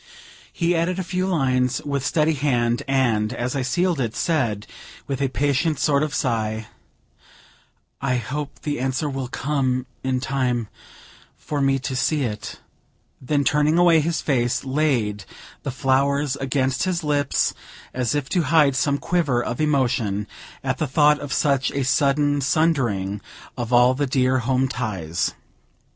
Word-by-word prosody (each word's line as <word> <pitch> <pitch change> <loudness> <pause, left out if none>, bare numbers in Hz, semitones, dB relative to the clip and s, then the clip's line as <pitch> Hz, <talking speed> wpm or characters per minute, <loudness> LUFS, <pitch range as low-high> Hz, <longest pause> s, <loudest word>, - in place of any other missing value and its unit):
He 170 +1 0
added 170 +2 0
a 190 - -2
few 185 +1 -2
lines, 130 -8 +1
with 140 -2 -1
steady 155 +2 +2
hand, 120 -5 +1
and, 120 -6 +1
as 125 +1 -3
I 135 - 0
sealed 175 +4 0
it, 115 -3 -2
said, 115 -11 0 0.4
with 135 -1 -3
a 135 - +2
patient 145 +3 0
sort 140 -1 +2
of 155 0 -1
sigh, 110 -5 -1 1.3
"I 135 -2 +1
hope 140 +5 -4
the 145 -4 -2
answer 130 +3 -1
will 135 -2 -3
come 130 -2 -1 0.2
in 130 -1 0
time 125 -4 -1 0.7
for 145 -2 -3
me 135 0 +3
to 130 0 -4
see 145 +3 +1
it;" 105 -4 -5 0.6
then, 140 +2 0
turning 150 +4 +2
away 175 -2 +6
his 160 +2 -1
face, 125 -3 0
laid 130 -8 0 0.4
the - - -4
flowers 140 +1 +1
against 135 +1 0
his 180 -3 -1
lips, 145 -2 +1 0.4
as 125 +2 -1
if 145 -2 -1
to 180 - +2
hide 150 -4 +4
some 140 +3 +1
quiver 145 -8 0
of 120 - -3
emotion 125 -9 +1 0.4
at - - -2
the 155 - 0
thought 150 +2 +4
of 145 -1 -7
such 140 -3 +2
a 140 - -2
sudden 145 +2 +2
sundering 120 - +1 0.3
of 120 -2 -4
all 125 +1 +5
the 140 +2 -1
dear 130 0 +2
home 130 +2 +1
ties. 105 -11 -2
135 Hz, 155 wpm, -23 LUFS, 125-150 Hz, 1.3 s, away